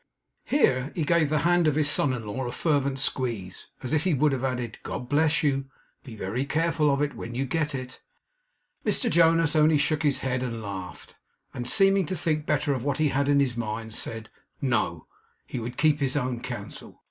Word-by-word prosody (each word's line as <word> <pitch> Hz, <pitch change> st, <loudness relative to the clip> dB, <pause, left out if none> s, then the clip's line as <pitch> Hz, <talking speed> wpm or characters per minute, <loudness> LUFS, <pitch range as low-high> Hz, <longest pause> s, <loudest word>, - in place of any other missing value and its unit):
Here 135 Hz, -, +2 dB
he 165 Hz, -, 0 dB
gave 160 Hz, 0 st, +2 dB
the 155 Hz, -, +1 dB
hand 175 Hz, -1 st, +4 dB
of 150 Hz, -, +2 dB
his 150 Hz, -1 st, +2 dB
son 145 Hz, -1 st, +3 dB
in 120 Hz, -3 st, -4 dB
law 120 Hz, +5 st, -3 dB
a -, -, -3 dB
fervent 140 Hz, -2 st, 0 dB
squeeze, 115 Hz, -9 st, -3 dB, 0.2 s
as 130 Hz, -, -3 dB
if 155 Hz, 0 st, +2 dB
he 185 Hz, -5 st, +2 dB
would 145 Hz, +2 st, +3 dB
have 135 Hz, -1 st, -2 dB
added, 125 Hz, -4 st, -3 dB
'God 125 Hz, -, -5 dB
bless 150 Hz, +4 st, +2 dB
you; 135 Hz, -2 st, +1 dB, 0.4 s
be 120 Hz, -5 st, -10 dB
very 110 Hz, +5 st, -2 dB
careful 160 Hz, +1 st, +1 dB
of 140 Hz, +1 st, +1 dB
it 145 Hz, -, -2 dB
when 120 Hz, +1 st, -7 dB
you 135 Hz, +2 st, -1 dB
get 150 Hz, +1 st, -1 dB
it!' 130 Hz, -1 st, -7 dB, 0.8 s
Mr 240 Hz, -4 st, +1 dB
Jonas 165 Hz, -2 st, +4 dB
only 155 Hz, 0 st, +5 dB
shook 150 Hz, +1 st, +1 dB
his 145 Hz, -3 st, +1 dB
head 130 Hz, -1 st, -1 dB
and 115 Hz, -3 st, -4 dB
laughed, 95 Hz, -3 st, -7 dB, 0.4 s
and, 120 Hz, 0 st, -4 dB
seeming 195 Hz, -3 st, +4 dB
to 185 Hz, -, -2 dB
think 155 Hz, -2 st, -1 dB
better 145 Hz, -1 st, +1 dB
of 130 Hz, -3 st, -3 dB
what 140 Hz, -1 st, -1 dB
he 155 Hz, -1 st, +2 dB
had 140 Hz, +1 st, 0 dB
had -, -, +1 dB
in 140 Hz, 0 st, +4 dB
his 130 Hz, -4 st, +1 dB
mind, 110 Hz, -1 st, -4 dB
said, 115 Hz, 0 st, -5 dB, 0.3 s
'No. 110 Hz, -, -1 dB, 0.4 s
He 125 Hz, -, -5 dB
would 120 Hz, +2 st, -6 dB
keep 150 Hz, -1 st, +3 dB
his 135 Hz, 0 st, +1 dB
own 125 Hz, -3 st, -1 dB
counsel. 120 Hz, -4 st, -8 dB
140 Hz, 210 wpm, -26 LUFS, 120-155 Hz, 0.8 s, only